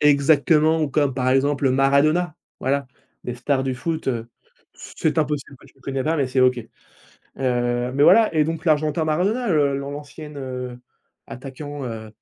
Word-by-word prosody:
Exactement 150 +2 +4
ou 150 - 0
comme 140 -1 +1
par 130 -1 0
exemple, 135 +1 +2
heu, - - +4
Maradona, 150 +5 +2 0.2
voilà, 140 +1 0 0.4
les 125 - -4
stars 135 +2 -1
du 130 -1 -1
foot, 160 +4 -4
heu, 115 -2 -2 0.5
c'est 155 -1 -3
impossible 145 -2 -2
que - - -18
tu - - -22
le - - -26
connais 135 0 -3
pas, 160 +2 +1
mais 140 -4 0
c'est 130 0 +1
OK. 125 0 +4 0.6
Heu 120 -1 -2
mais 140 - +3
voilà 220 +3 +6
et 155 - +4
donc 160 +1 -4
l'argentin 155 0 +1
Maradona, 200 +10 0
heu, 145 -5 +2
l'an 140 0 -5
l'ancienne, 150 +1 -9
heu, 125 -2 -6 0.5
attaquant, 140 +2 -7
heu, 110 -2 -6
140 Hz, 175 wpm, -22 LUFS, 130-155 Hz, 0.6 s, voilà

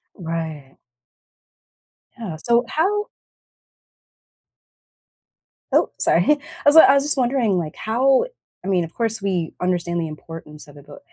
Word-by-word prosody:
Right. 160 -5 -6 1.5
Yeah, 195 -9 -5
so 235 0 +3
how 415 +6 0 2.7
Oh, - - +3
sorry, - - +3
I 295 - +2 0.3
was 290 +1 +5
I 320 -4 +9
was 280 0 +3
just 295 -1 0
wondering, 245 -6 +1
like, 160 -3 -4
how 260 - +2 0.4
I - - -7
mean, 185 -3 +2
of 165 0 -9
course, 225 -2 -2
we 180 -5 -2
understand 175 -1 -1
the 165 - -2
importance 155 0 -11
of 145 - -16
it, 145 - -15
but 145 - -12
185 Hz, 135 wpm, -21 LUFS, 165-255 Hz, 2.7 s, I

